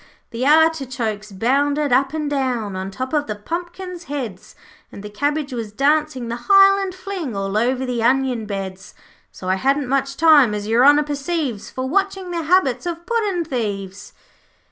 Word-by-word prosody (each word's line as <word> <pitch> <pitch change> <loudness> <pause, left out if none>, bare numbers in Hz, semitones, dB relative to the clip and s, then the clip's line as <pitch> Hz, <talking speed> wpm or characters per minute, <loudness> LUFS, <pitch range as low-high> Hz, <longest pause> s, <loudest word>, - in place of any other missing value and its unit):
'The 230 +2 -4
artichokes 260 -9 +1
bounded 280 +7 +1
up 265 +1 +3
and 310 -1 -3
down 250 -8 -1
On 190 +1 -4
top 255 +7 -5
of 295 -1 0
the 210 - -3
pumpkins' 345 - -6
heads, 245 -10 -6 0.4
And 200 - -10
the 210 - -8
cabbage 285 +4 -2
was 230 -4 -5
dancing 285 0 +1
the 235 +1 -6
highland 390 -1 +5
fling 370 - -5
All 195 0 -3
over 250 +4 +1
the 245 -2 -2
onion 250 -2 +1
beds. 190 -1 -6 0.4
'So 185 - -9
I 185 +1 +1
hadn't 275 +4 +1
much 275 +1 -1
time, 295 -9 +5
as 205 0 -4
Your 230 +3 +3
Honour 290 +2 +6
perceives, 285 - -3
For 260 0 -4
watching 385 +2 -1
the 340 -1 -2
habits 310 -5 +2
of 340 0 -5
puddin' 410 -6 -1
thieves.' 200 - -4
270 Hz, 165 wpm, -20 LUFS, 225-315 Hz, 0.4 s, Honour